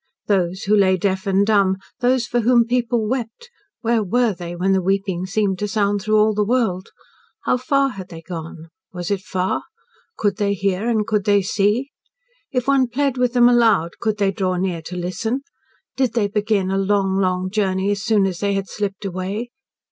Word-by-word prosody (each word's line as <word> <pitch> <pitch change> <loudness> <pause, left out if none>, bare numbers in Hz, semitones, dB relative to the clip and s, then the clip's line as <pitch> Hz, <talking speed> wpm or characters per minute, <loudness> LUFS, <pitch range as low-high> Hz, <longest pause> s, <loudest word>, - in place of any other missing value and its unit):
Those 185 -2 0
who 210 +2 +3
lay 190 -2 +4
deaf 190 +1 -1
and 195 +1 +3
dumb, 200 -3 +3 0.2
those 250 0 +2
for 240 - 0
whom 235 0 +4
people 235 -2 0
wept 255 - -4 0.3
where 230 -1 +1
were 230 +3 +1
they 175 -1 -7
when 185 +2 0
the 190 -1 +3
weeping 190 -1 -1
seemed 195 -2 0
to 210 - -1
sound 205 -1 0
through 215 +2 +2
all 215 0 +4
the 210 0 +1
world? 205 -5 0 0.5
How - - +2
far 275 +2 +1
had 195 -6 -8
they 165 -2 -10
gone? 165 -1 -8 0.2
Was 180 +1 -5
it 200 -2 0
far? 190 -2 -2 0.6
Could 205 -2 0
they 200 -1 0
hear 195 +3 -1
and 220 -3 +1
could 210 -2 0
they 205 -1 +3
see? 210 +8 0 0.6
If 250 -2 -1
one 275 -2 +3
plead 270 +1 -1
with 250 -1 +1
them 240 -1 +6
aloud, 225 -9 +3
could 215 -2 -1
they 200 -2 +2
draw 185 -1 -1
near 180 -2 -2
to 180 - -7
listen? 185 +9 -2 0.5
Did 260 -4 0
they 225 -3 +1
begin 205 -2 0
a 195 - +1
long, 195 -1 +1
long 185 -1 0
journey 195 -1 0
as 205 -1 -2
soon 215 -3 +2
as 185 -3 -3
they 200 -1 0
had 195 0 -2
slipped 200 -1 -4
away? 195 +6 -4
200 Hz, 195 wpm, -21 LUFS, 190-230 Hz, 0.6 s, them